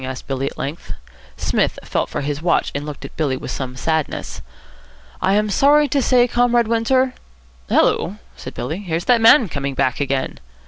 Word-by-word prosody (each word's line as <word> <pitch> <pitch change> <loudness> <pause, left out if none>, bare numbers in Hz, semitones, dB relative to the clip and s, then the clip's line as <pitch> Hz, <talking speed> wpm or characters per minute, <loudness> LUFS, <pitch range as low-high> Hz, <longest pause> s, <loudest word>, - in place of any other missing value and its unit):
asked 130 0 -6
Billy 135 0 -2
at - - -7
length. 145 +4 -5 0.4
Psmith - - 0
felt - - -2
for - - -3
his 145 +1 -3
watch, 170 0 +1
and 145 +1 -4
looked 150 -2 -7
at - - -11
Billy 140 -5 0
with - - -6
some 130 -2 -5
sadness. 160 +3 -2 0.8
"I 190 +1 +2
am 210 0 +1
sorry 290 +6 +4
to 280 +1 +1
say, 250 -1 +4
Comrade 240 -1 +2
Windsor 255 +3 +2 0.3
" 60 0 -30
"Hullo," 190 - +2 0.2
said - - -9
Billy, 160 +5 -4
"here's 175 -3 -3
that 245 -2 +4
man 230 +1 +7
coming 140 -4 -4
back 130 -2 0
again." 135 -2 -2
165 Hz, 185 wpm, -20 LUFS, -, 0.8 s, man